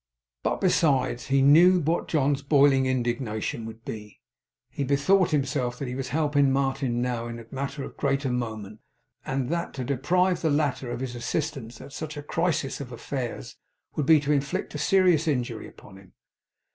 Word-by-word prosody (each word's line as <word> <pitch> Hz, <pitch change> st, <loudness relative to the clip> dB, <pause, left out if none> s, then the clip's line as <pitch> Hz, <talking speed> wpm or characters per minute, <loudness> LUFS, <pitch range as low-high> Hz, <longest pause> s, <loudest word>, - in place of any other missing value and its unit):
But -, -, -1 dB
besides 135 Hz, -9 st, +2 dB
that -, -, -9 dB
he 135 Hz, -, +4 dB
knew 175 Hz, +6 st, +7 dB
what 165 Hz, +2 st, 0 dB
John's 140 Hz, -2 st, +1 dB
boiling 140 Hz, -2 st, +4 dB
indignation 120 Hz, -3 st, -2 dB
would 115 Hz, 0 st, -11 dB
be, 105 Hz, -2 st, -8 dB, 0.5 s
he 140 Hz, -, -3 dB
bethought 145 Hz, +8 st, +3 dB
himself 135 Hz, -4 st, -1 dB
that 140 Hz, -, -4 dB
he 125 Hz, -, -4 dB
was 130 Hz, 0 st, -4 dB
helping 145 Hz, 0 st, +2 dB
Martin 135 Hz, -3 st, 0 dB
now 120 Hz, -2 st, -2 dB
in 115 Hz, 0 st, -6 dB
a 115 Hz, -, -10 dB
matter 140 Hz, +1 st, -4 dB
of -, -, -9 dB
great 140 Hz, 0 st, 0 dB
moment, 110 Hz, -5 st, -3 dB, 0.5 s
and 135 Hz, -2 st, -1 dB
that 170 Hz, +1 st, -2 dB
to 130 Hz, -, -3 dB
deprive 175 Hz, +8 st, +1 dB
the 160 Hz, -, +1 dB
latter 145 Hz, -4 st, 0 dB
of 120 Hz, -, -4 dB
his 130 Hz, -2 st, -4 dB
assistance 125 Hz, -1 st, -4 dB
at 140 Hz, -, -11 dB
such 155 Hz, +1 st, -6 dB
a 145 Hz, -, -6 dB
crisis 160 Hz, -3 st, -1 dB
of 125 Hz, -3 st, -8 dB
affairs, 120 Hz, -, -5 dB, 0.4 s
would 145 Hz, -, -1 dB
be 160 Hz, -1 st, +7 dB
to 145 Hz, 0 st, -1 dB
inflict 140 Hz, -1 st, -1 dB
a 150 Hz, -, -4 dB
serious 180 Hz, -1 st, +3 dB
injury 120 Hz, -6 st, -1 dB
upon 95 Hz, -2 st, -15 dB
him. 95 Hz, -1 st, -18 dB
135 Hz, 180 wpm, -26 LUFS, 120-150 Hz, 0.5 s, knew